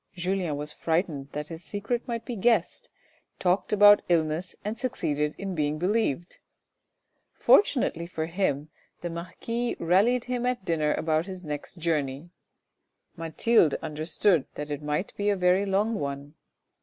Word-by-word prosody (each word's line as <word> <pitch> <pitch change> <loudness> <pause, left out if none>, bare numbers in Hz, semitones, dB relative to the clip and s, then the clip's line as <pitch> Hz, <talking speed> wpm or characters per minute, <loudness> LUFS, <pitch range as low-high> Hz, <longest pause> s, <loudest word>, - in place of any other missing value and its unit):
Julien 180 -3 -1
was 150 +1 -4
frightened 160 -4 -1
that 150 0 -4
his 165 0 -8
secret 220 +6 -3
might 235 -2 -3
be 245 - -4
guessed, 225 - +1 0.5
talked 180 +1 +1
about 205 0 +7
illness 165 +1 0
and 210 +2 -2
succeeded 150 - -1
in 195 -1 -4
being 150 -2 0
believed. 180 -2 -1 0.9
Fortunately 210 - +3
for 160 -2 -3
him 160 -4 -1 0.3
the 175 - -4
marquis 230 +8 -3
rallied 205 +9 +3
him 250 -1 -2
at 250 -6 -2
dinner 155 -3 +1
about 160 +2 0
his 185 -2 -7
next 150 +3 -6
journey; 155 -1 -2 0.8
Mathilde 165 +1 +2
understood 160 +2 +1
that 150 0 -5
it 145 0 -3
might 150 +6 -2
be 205 0 +1
a 205 - +3
very 185 +2 +2
long 205 +4 +1
one. 140 -4 -4
175 Hz, 145 wpm, -27 LUFS, 155-205 Hz, 0.9 s, about